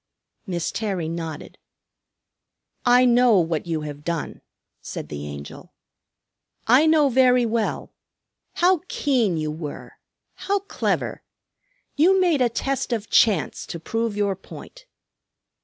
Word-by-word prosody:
Miss 175 Hz, -3 st, -2 dB
Terry 195 Hz, -7 st, -3 dB
nodded. 165 Hz, -2 st, -6 dB, 1.3 s
"I 250 Hz, +1 st, +6 dB
know 245 Hz, -2 st, +5 dB
what 165 Hz, -1 st, 0 dB
you 160 Hz, -2 st, -2 dB
have 145 Hz, -1 st, -7 dB
done," 170 Hz, -1 st, -4 dB, 0.4 s
said -, -, -7 dB
the 75 Hz, 0 st, -6 dB
Angel. 70 Hz, 0 st, -10 dB, 0.9 s
"I 260 Hz, +7 st, +5 dB
know 310 Hz, -2 st, +4 dB
very 250 Hz, -1 st, +4 dB
well. 225 Hz, -1 st, -2 dB, 0.6 s
How 360 Hz, -1 st, +3 dB
keen 240 Hz, -, 0 dB
you 155 Hz, -1 st, -2 dB
were! 150 Hz, -1 st, -8 dB, 0.3 s
How 400 Hz, 0 st, -2 dB
clever! 395 Hz, -, -2 dB, 0.7 s
You 370 Hz, +6 st, +4 dB
made 340 Hz, -7 st, +2 dB
a 245 Hz, -, +3 dB
test 270 Hz, +3 st, -2 dB
of 225 Hz, -2 st, -3 dB
Chance, 200 Hz, -9 st, +2 dB
to 170 Hz, -, -6 dB
prove 225 Hz, +4 st, -2 dB
your 200 Hz, -2 st, 0 dB
point." -, -, -13 dB
220 Hz, 125 wpm, -23 LUFS, 165-260 Hz, 1.3 s, I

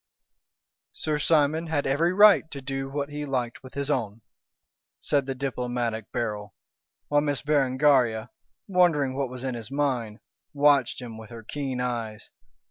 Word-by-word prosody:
"Sir 155 Hz, -1 st, -2 dB
Simon 160 Hz, +1 st, +2 dB
had 150 Hz, -3 st, -1 dB
every 155 Hz, +6 st, +2 dB
right 200 Hz, -4 st, +6 dB
to 140 Hz, -, -6 dB
do 135 Hz, 0 st, -4 dB
what 140 Hz, +1 st, -3 dB
he 150 Hz, 0 st, -5 dB
liked 125 Hz, -4 st, -3 dB
with 130 Hz, -, -13 dB
his 140 Hz, +1 st, -1 dB
own," 115 Hz, -5 st, -2 dB, 0.8 s
said 140 Hz, -2 st, 0 dB
the 135 Hz, -, -3 dB
diplomatic 120 Hz, -4 st, -3 dB
Beryl, 105 Hz, -4 st, -3 dB, 0.5 s
while 145 Hz, 0 st, +3 dB
Miss 145 Hz, -2 st, -1 dB
Berengaria, 130 Hz, -5 st, +2 dB, 0.4 s
wondering 165 Hz, -8 st, +2 dB
what 135 Hz, -2 st, -1 dB
was 125 Hz, 0 st, -8 dB
in 130 Hz, -1 st, -2 dB
his 115 Hz, -2 st, -7 dB
mind, 130 Hz, -6 st, -1 dB, 0.4 s
watched 140 Hz, -3 st, +3 dB
him 115 Hz, -2 st, -8 dB
with 110 Hz, -, -11 dB
her 115 Hz, -1 st, -10 dB
keen 135 Hz, +1 st, -4 dB
eyes. 115 Hz, -4 st, -4 dB
135 Hz, 150 wpm, -26 LUFS, 120-145 Hz, 0.8 s, right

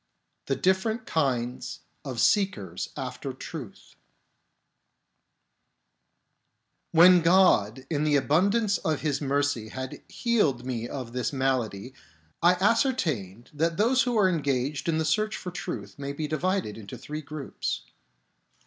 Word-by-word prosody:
The 135 Hz, -, +1 dB
Different 220 Hz, -, +1 dB
Kinds 125 Hz, -5 st, -1 dB, 0.2 s
of 130 Hz, -4 st, -5 dB
Seekers 105 Hz, -, +1 dB
after 130 Hz, +1 st, -5 dB
Truth 130 Hz, -4 st, -9 dB, 3.0 s
When 175 Hz, +2 st, +7 dB
God 145 Hz, -, +4 dB
in 150 Hz, -1 st, -1 dB
the 150 Hz, -1 st, +3 dB
abundance 200 Hz, +9 st, +2 dB
of 155 Hz, -3 st, -1 dB
His 145 Hz, -2 st, -1 dB
mercy 140 Hz, -5 st, 0 dB
had 130 Hz, +2 st, -6 dB
healed 160 Hz, -, +1 dB
me 120 Hz, -2 st, -3 dB
of 125 Hz, -4 st, -6 dB
this 125 Hz, -1 st, -1 dB
malady, 130 Hz, -4 st, -1 dB, 0.5 s
I 175 Hz, +2 st, +5 dB
ascertained 180 Hz, -, 0 dB
that 165 Hz, +2 st, 0 dB
those 245 Hz, +5 st, +4 dB
who 245 Hz, -3 st, 0 dB
are 200 Hz, -3 st, +5 dB
engaged 145 Hz, -3 st, -1 dB
in 160 Hz, -, +1 dB
the 160 Hz, -, 0 dB
search 215 Hz, +8 st, +1 dB
for 180 Hz, -, -6 dB
truth 105 Hz, -, -6 dB
may 140 Hz, 0 st, -4 dB
be 150 Hz, +1 st, -3 dB
divided 155 Hz, -, -1 dB
into 100 Hz, -2 st, -9 dB
three 150 Hz, +1 st, -6 dB
groups. 145 Hz, -, -4 dB
145 Hz, 125 wpm, -27 LUFS, 125-185 Hz, 3.0 s, When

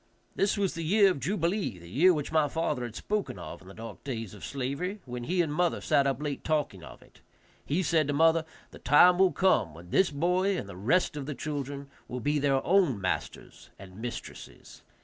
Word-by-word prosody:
This 200 Hz, +2 st, +1 dB
was 195 Hz, -3 st, 0 dB
the 165 Hz, 0 st, -5 dB
year 195 Hz, +4 st, +5 dB
of 160 Hz, -, -4 dB
jubilee, 170 Hz, -, -1 dB
the 85 Hz, -1 st, -13 dB
year 150 Hz, -, +4 dB
which 150 Hz, -5 st, -2 dB
my 155 Hz, -2 st, +3 dB
father 150 Hz, -3 st, -2 dB
had 115 Hz, -2 st, -8 dB
spoken 210 Hz, -, -3 dB
of 85 Hz, -3 st, -8 dB
in 95 Hz, -, -16 dB
the 95 Hz, -, -11 dB
dark 115 Hz, -2 st, -9 dB
days 115 Hz, -7 st, -5 dB
of 105 Hz, -, -12 dB
slavery, 140 Hz, +10 st, -3 dB
when 125 Hz, -1 st, -6 dB
he 175 Hz, +3 st, +1 dB
and 150 Hz, -3 st, -3 dB
mother 175 Hz, +2 st, +1 dB
sat 140 Hz, -1 st, +2 dB
up 135 Hz, -1 st, -1 dB
late 145 Hz, -2 st, -4 dB
talking 150 Hz, -, -1 dB
of -, -, -12 dB
it. -, -, -23 dB, 0.4 s
He 165 Hz, +6 st, 0 dB
said 160 Hz, -3 st, +2 dB
to 145 Hz, -, 0 dB
mother, 165 Hz, +2 st, +4 dB, 0.3 s
"The -, -, -12 dB
time 175 Hz, +6 st, +6 dB
will 190 Hz, -1 st, +5 dB
come 145 Hz, -, +2 dB
when 85 Hz, +2 st, -13 dB
this 190 Hz, -, +4 dB
boy 180 Hz, +6 st, +1 dB
and 100 Hz, -, -5 dB
the 100 Hz, -, -9 dB
rest 130 Hz, -, +1 dB
of 140 Hz, -2 st, -5 dB
the 150 Hz, -, -4 dB
children 140 Hz, 0 st, -5 dB, 0.2 s
will 125 Hz, -, -5 dB
be 145 Hz, +5 st, 0 dB
their 140 Hz, -1 st, +1 dB
own 175 Hz, -, +3 dB
masters 95 Hz, -1 st, -4 dB
and 95 Hz, +2 st, -12 dB
mistresses." 120 Hz, 0 st, -8 dB
145 Hz, 215 wpm, -28 LUFS, 125-175 Hz, 0.4 s, time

